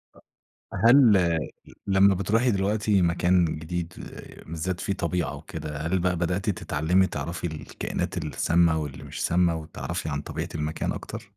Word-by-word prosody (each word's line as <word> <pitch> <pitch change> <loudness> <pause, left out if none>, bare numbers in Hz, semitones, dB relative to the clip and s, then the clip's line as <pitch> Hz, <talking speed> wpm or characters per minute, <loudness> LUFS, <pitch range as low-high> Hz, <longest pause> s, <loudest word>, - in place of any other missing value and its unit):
أ - - -18 0.5
هل 110 -9 +5 0.5
لمّا 95 0 +5
بتروحي 115 +6 +2
دلوقتي 100 0 +1
مكان 90 +1 +3
جديد 85 +2 -4 0.5
بالذات 85 +3 -3
فيه 100 - -1
طبيعة 85 -5 -2
وكده، 75 0 -7
هل 85 +5 0
بقى 90 0 +1
بدأتِ 90 +5 -1
تتعلمي 90 +1 +1
تعرفي 85 +4 -4
الكائنات 75 -3 -4
السامة، 80 +2 +2
واللي 70 -2 -7
مش - - -4
سامة 85 -1 +2
وتعرفي 80 0 -5
عن 75 -1 -2
طبيعة - - -5
المكان 75 +1 -2
أكتر؟ - - -6
85 Hz, 135 wpm, -26 LUFS, 80-95 Hz, 0.5 s, هل